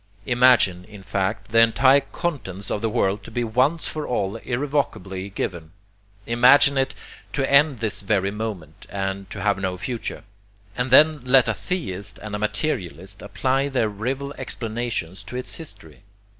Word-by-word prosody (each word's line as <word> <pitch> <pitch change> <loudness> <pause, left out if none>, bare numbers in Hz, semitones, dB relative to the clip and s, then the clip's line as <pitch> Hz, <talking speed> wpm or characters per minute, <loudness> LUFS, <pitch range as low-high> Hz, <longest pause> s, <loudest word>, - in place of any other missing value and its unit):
Imagine, 120 -8 +4
in 105 -3 -13
fact, 95 +4 -2
the 115 +1 +4
entire 130 +4 +5
contents 130 - -5
of 105 - -1
the 115 - 0
world 100 -1 0
to - - -10
be 120 +2 -2
once 130 +8 +1
for 155 -1 -3
all 105 -3 -1
irrevocably 120 -8 -2
given. 85 -4 -5 0.5
Imagine 125 +4 +6
it 135 0 0 0.4
to 135 -2 0
end 140 -3 +4
this 110 -2 -2
very 100 -1 +1
moment, 100 -8 -6
and 95 0 -4
to 100 - -6
have 100 -1 +1
no 95 -2 -2
future; 115 +2 -5 0.5
and 125 +2 -1
then 150 +4 +6
let 130 0 +5
a 115 - +1
theist 100 - -4
and 105 +2 -8
a - - -3
materialist 100 - -3
apply 135 +6 0
their 125 -5 +1
rival 130 +7 -4
explanations 110 -5 -3
to 105 +4 -10
its 125 - -5
history. 110 -11 -11
115 Hz, 155 wpm, -23 LUFS, 100-130 Hz, 0.5 s, Imagine